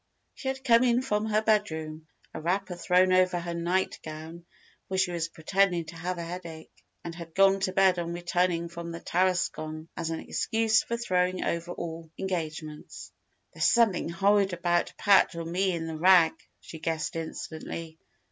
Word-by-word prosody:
She 265 - -8
had 265 0 -3
come 235 -1 +5
in 245 0 +3
from 210 -4 0
her 215 0 +1
bedroom, 160 -8 -1 0.3
a 160 - -6
wrapper 185 +2 -1
thrown 180 +1 +3
over 185 -1 +3
her 170 0 -5
nightgown, 170 -1 -3 0.4
for 190 - -3
she 185 -1 +2
was 170 -1 -2
pretending 175 +1 +1
to 160 +2 -10
have 175 +2 -3
a 170 - -4
headache, 170 -2 -8 0.3
and 170 - -6
had 165 -1 -10
gone 195 0 +5
to 190 -1 0
bed 190 -1 +3
on 170 0 -3
returning 175 0 0
from 170 0 -7
the 165 - -6
Tarascon, 170 -3 -1
as 165 -1 -3
an 165 - -3
excuse 225 -1 +1
for 235 - -3
throwing 185 -5 0
over 170 +1 -2
all 165 -1 -6
engagements. 160 -5 -5 0.4
"There's - - 0
something 225 -8 +3
horrid 195 +2 +2
about 175 0 0
Pat 200 -4 +4
or 165 0 -4
me 185 +3 0
in 165 -2 -3
the 160 -1 -5
rag," 175 -2 +6 0.3
she 160 - -10
guessed 160 0 -2
instantly. 160 0 -6
175 Hz, 170 wpm, -28 LUFS, 165-190 Hz, 0.4 s, rag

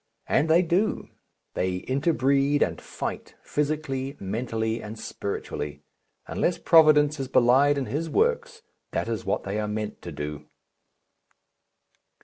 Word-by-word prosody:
And 160 - +1
they 170 +3 +5
do. 180 +5 0 0.4
They 90 0 -2
inter 140 +6 +1
breed 140 0 +2
and - - -3
fight, - - -6
physically, 145 -2 -2
mentally, 110 +2 -2
and 110 +1 -8
spiritually. 75 -9 -5 0.4
Unless 175 - 0
Providence 150 -2 +5
is 135 - -3
belied 135 +3 +4
in 135 - -1
His 160 +5 -3
works 470 - 0 0.3
that - - -1
is 115 -2 -3
what - - -1
they 100 +2 -3
are 105 - -1
meant 105 0 -4
to - - -7
do. 75 0 -6
135 Hz, 130 wpm, -26 LUFS, 110-155 Hz, 0.4 s, they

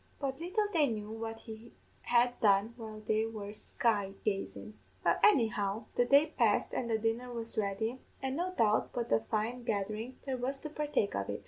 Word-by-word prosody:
But 270 -1 -2
little 370 +6 0
they 310 -4 +4
knew 215 -3 -4
what 225 0 -5
he 225 0 -10 0.3
had 245 0 +2
done 205 +2 +4
while 220 -2 -8
they 220 +1 +1
were 210 -2 -6
sky 205 -2 0
gazin'! 210 +1 -2 0.3
"Well, - - +3
anyhow, 220 - +3
the 245 - +3
day 280 +4 +6
passed 225 -5 +2
and 235 - -2
the 225 - +2
dinner 225 +3 -1
was 230 -1 -4
ready, 220 +4 -1 0.2
an' 265 0 -2
no 355 +4 -1
doubt 220 -11 +2
but 240 -1 -3
a 115 - +5
fine 220 - -2
gatherin' 215 +3 -2
there 265 -2 -1
was 260 +3 -2
to 305 - -6
partake 295 -9 0
of 100 0 -2
it. 100 - -3
225 Hz, 190 wpm, -32 LUFS, 215-250 Hz, 0.3 s, day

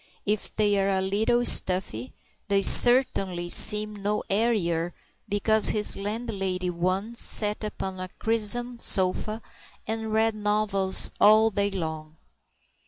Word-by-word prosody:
If 210 0 -3
they 205 -2 +1
are 195 - -1
a 190 -1 0
little 215 +6 -1
stuffy, 180 - +2 0.4
they 200 -1 +1
certainly 195 -10 +2
seem 210 +2 +3
no 205 +1 -3
airier 180 -6 -1 0.3
because 215 +1 +3
his 210 -1 +2
landlady 195 -4 -4
once 185 +7 -3
sat 210 0 +1
upon 190 -3 -6
a 185 0 -7
crimson 230 +2 -1
sofa 215 +3 +1 0.4
and 220 0 -5
read 220 +1 +1
novels 210 -2 -1
all 215 +1 +4
day 200 0 -1
long. 160 -4 -7
205 Hz, 120 wpm, -24 LUFS, 190-220 Hz, 0.4 s, all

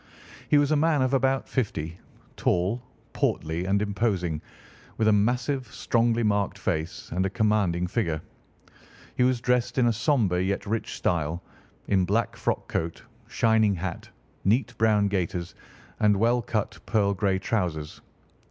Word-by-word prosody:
He 150 - +5
was 145 0 +3
a - - +4
man 150 -2 +3
of 130 +1 0
about 135 0 +1
fifty, 85 - -2 0.4
tall, 95 +7 0 0.3
portly, 80 +3 -1
and 100 +2 +2
imposing, 95 -7 -1 0.6
with 110 - +2
a 110 - +5
massive, 125 +5 +1
strongly 115 0 +1
marked 100 -2 +1
face 80 +2 -3
and 90 +3 0
a 95 - 0
commanding 100 -5 +1
figure. 90 -5 -1 1.0
He - - 0
was 125 -1 +3
dressed 125 0 +1
in 125 - +4
a 120 - +3
sombre 105 - +1
yet 100 +2 -1
rich 110 +2 -2
style, 85 0 -1 0.4
in 95 -2 +3
black 105 +3 0
frock - - -2
coat, 80 0 -3 0.2
shining 110 -3 +3
hat, 90 0 -5 0.3
neat 120 +4 +1
brown 105 -2 +4
gaiters, 90 -3 -2 0.5
and 105 -1 +4
well 120 +4 +3
cut 110 -2 -3
pearl 100 -3 +2
grey 95 -1 +1
trousers. 90 -7 -2
105 Hz, 145 wpm, -26 LUFS, 90-120 Hz, 1.0 s, He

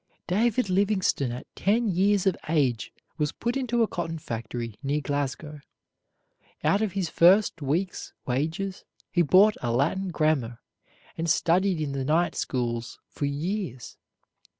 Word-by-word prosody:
David 225 +5 +1
Livingstone 190 - +1
at 125 - -6
ten 225 +4 +1
years 200 +1 +2
of 190 - +3
age 135 -8 +1 0.3
was 150 -1 +1
put 235 +2 -3
into 240 -3 +1
a - - +1
cotton 165 -3 -4
factory 115 -4 -5
near 145 +2 0
Glasgow. 145 +1 -3 1.0
Out 200 - +3
of 215 -4 -1
his 195 -3 -1
first 175 +2 +4
week's 165 +7 -2
wages 160 +9 -2 0.3
he 175 - +3
bought 190 +6 +5
a 120 - -1
Latin 155 +11 +1
grammar, 155 -8 0 0.6
and 165 +1 -1
studied 180 +2 +2
in 150 -2 -2
the 135 -1 -2
night 160 +5 +2
schools 120 -2 -3
for 145 - -3
years. 145 - -3
165 Hz, 140 wpm, -26 LUFS, 140-195 Hz, 1.0 s, bought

